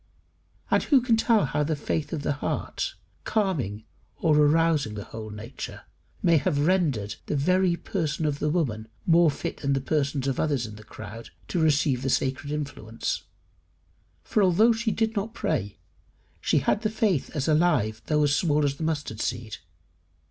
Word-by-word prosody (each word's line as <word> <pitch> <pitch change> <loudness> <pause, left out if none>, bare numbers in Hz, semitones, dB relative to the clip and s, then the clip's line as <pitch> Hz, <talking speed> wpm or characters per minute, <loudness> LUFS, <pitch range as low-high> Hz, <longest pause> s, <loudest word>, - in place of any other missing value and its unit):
And - - +4
who 280 -4 +4
can 240 -2 +2
tell 225 -3 +3
how 150 - -1
the 155 +1 0
faith 150 +1 -2
of 155 -4 -3
the - - 0
heart, 145 - -3 0.3
calming 145 - -1 0.4
or 155 -2 +3
arousing 150 -5 +3
the 105 - -5
whole 110 +1 -8
nature, 105 +5 -8 0.4
may 170 -2 +5
have 145 -2 +1
rendered 145 - +1
the - - -1
very 180 +5 +3
person 160 -4 -2
of 145 -1 -1
the 150 - 0
woman 125 -10 -1 0.2
more 170 -1 +5
fit 140 - -4
than 140 -1 0
the 135 - +1
persons 140 -1 -1
of 135 - -1
others 140 -6 +1
in 110 -1 -8
the 110 - -12
crowd 110 +2 -9 0.2
to 175 - 0
receive 145 -4 +2
the 135 - -1
sacred 135 +3 0
influence? 140 -7 -4 1.0
For 215 - +1
although 200 +5 +5
she 225 +1 -1
did 225 +1 0
not 215 +3 -3
pray, 100 -2 -2 0.6
she - - +1
had 210 - +1
the 215 - 0
faith 210 - 0
as 140 -3 -1
alive 150 -10 +2
though 150 -1 +3
as 145 -1 +3
small 150 -2 +2
as 140 -1 -1
the - - -4
mustard 150 -9 -2
seed. 120 -3 -3
150 Hz, 175 wpm, -26 LUFS, 130-175 Hz, 1.0 s, may